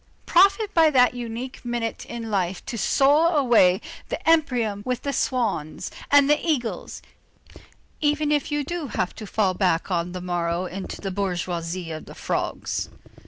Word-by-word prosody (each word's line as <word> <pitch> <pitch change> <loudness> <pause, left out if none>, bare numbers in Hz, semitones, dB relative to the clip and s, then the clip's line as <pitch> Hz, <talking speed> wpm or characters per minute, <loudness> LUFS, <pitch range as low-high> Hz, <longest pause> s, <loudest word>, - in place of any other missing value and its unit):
Profit 395 +4 +4
by 325 -2 +6
that 250 -4 +4
unique 245 +1 -6
minute 240 -2 -3
in 230 -2 -6
life 185 -2 -1
to 245 - -5
soar 295 - +3
away 230 -9 +5
to - - -13 0.2
the - - -5
empyrean 245 -11 +2
with 250 +1 -3
the 280 - -2
swans 225 - -1 0.2
and 285 -1 +6
the 295 +1 +2
eagles, 275 -9 -2 1.0
even 295 0 +1
if 295 0 0
you 295 0 0
do 340 +1 -4
have 185 -7 -2
to 215 - -9
fall 195 -2 +1
back 180 -1 0
on 175 0 -1
the 185 - -4
morrow 175 0 -1
into 190 +1 -6
the 195 - -3
bourgeoisie 175 -2 -3
of 155 - -6
the - - -12
frogs. - - -3
235 Hz, 165 wpm, -24 LUFS, 185-290 Hz, 1.0 s, by